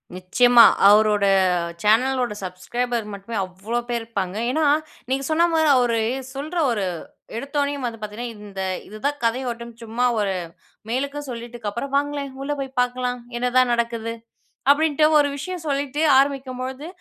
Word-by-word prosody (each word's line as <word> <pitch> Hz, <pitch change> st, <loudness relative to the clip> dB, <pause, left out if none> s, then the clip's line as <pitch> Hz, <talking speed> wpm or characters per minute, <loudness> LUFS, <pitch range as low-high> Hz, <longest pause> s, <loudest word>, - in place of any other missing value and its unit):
நிச்சயமா. 235 Hz, +6 st, +5 dB, 0.3 s
அவரோட 210 Hz, -1 st, +4 dB, 0.6 s
சேனலோட 245 Hz, +2 st, +2 dB
"சப்ஸ்க்ரைபர்" 230 Hz, +6 st, -3 dB
மட்டுமே, 200 Hz, +3 st, -7 dB
அவ்ளோ 190 Hz, +6 st, -4 dB
பேரு 240 Hz, -1 st, 0 dB
இருப்பாங்க. 200 Hz, -5 st, -4 dB, 0.2 s
ஏன்னா, 315 Hz, +3 st, +1 dB, 0.4 s
நீங்க 270 Hz, +1 st, 0 dB
சொன்ன 330 Hz, +2 st, +3 dB
மாரி 315 Hz, -1 st, +3 dB
அவரு 240 Hz, -2 st, +2 dB, 0.3 s
சொல்ற 300 Hz, +6 st, -5 dB
ஒரு 210 Hz, -4 st, -1 dB, 0.5 s
எடுத்தோனேயும் 280 Hz, +1 st, -2 dB
வந்து 230 Hz, -2 st, -4 dB
பாத்தீங்கன்னா, 215 Hz, +3 st, -5 dB, 0.2 s
இந்த 195 Hz, -2 st, -6 dB, 0.3 s
இதுதான் 275 Hz, +8 st, -3 dB
கதை 230 Hz, +3 st, +1 dB
ஓட்டம்னு 235 Hz, 0 st, -8 dB
சும்மா 230 Hz, +2 st, -1 dB
ஒரு, 200 Hz, -2 st, 0 dB, 0.5 s
மேலுக்கு 280 Hz, +4 st, -2 dB
சொல்லிட்க்கப்பறம், 235 Hz, +1 st, -5 dB
"வாங்களேன், 285 Hz, -1 st, -2 dB
உள்ள 275 Hz, +2 st, -3 dB
போய் 270 Hz, -1 st, -6 dB
பாக்கலாம், 250 Hz, 0 st, -1 dB, 0.2 s
என்னதான் 250 Hz, 0 st, +2 dB
நடக்குது" 230 Hz, -1 st, -1 dB, 0.6 s
அப்படீன்ட்டு 305 Hz, +1 st, +3 dB
ஒரு 290 Hz, -1 st, +3 dB
விஷயம் 350 Hz, +5 st, -5 dB
சொல்லிட்டு 285 Hz, +1 st, -1 dB, 0.2 s
ஆரம்பிக்கும்பொழுது, 265 Hz, 0 st, -1 dB
245 Hz, 130 wpm, -22 LUFS, 225-275 Hz, 0.6 s, நிச்சயமா